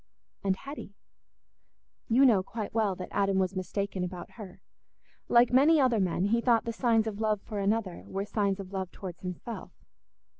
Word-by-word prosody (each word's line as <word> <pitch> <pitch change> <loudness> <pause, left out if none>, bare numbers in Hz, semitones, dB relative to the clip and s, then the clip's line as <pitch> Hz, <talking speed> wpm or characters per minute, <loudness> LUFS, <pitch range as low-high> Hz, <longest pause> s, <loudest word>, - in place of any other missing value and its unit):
And 195 -1 +2
Hetty? 275 -3 -9 1.1
You 255 +4 +5
know 220 -7 +5
quite 210 +2 -6
well 215 -4 +1
that 180 0 -7
Adam 195 -1 +1
was 190 0 0
mistaken 190 0 -2
about 180 -1 -6
her. 190 -4 -11 0.7
Like 240 +1 +5
many 295 +5 +6
other 250 -5 +3
men, 185 -1 +1
he 230 +3 +2
thought 235 -2 +3
the 230 - -2
signs 225 -2 +2
of 215 -1 -4
love 215 -1 +1
for 210 -3 -5
another 200 -2 -1
were 195 +1 -3
signs 200 -2 0
of 195 0 -8
love 190 -2 -3
towards 185 -4 -8
himself. 185 +5 -7
200 Hz, 175 wpm, -29 LUFS, 190-230 Hz, 1.1 s, many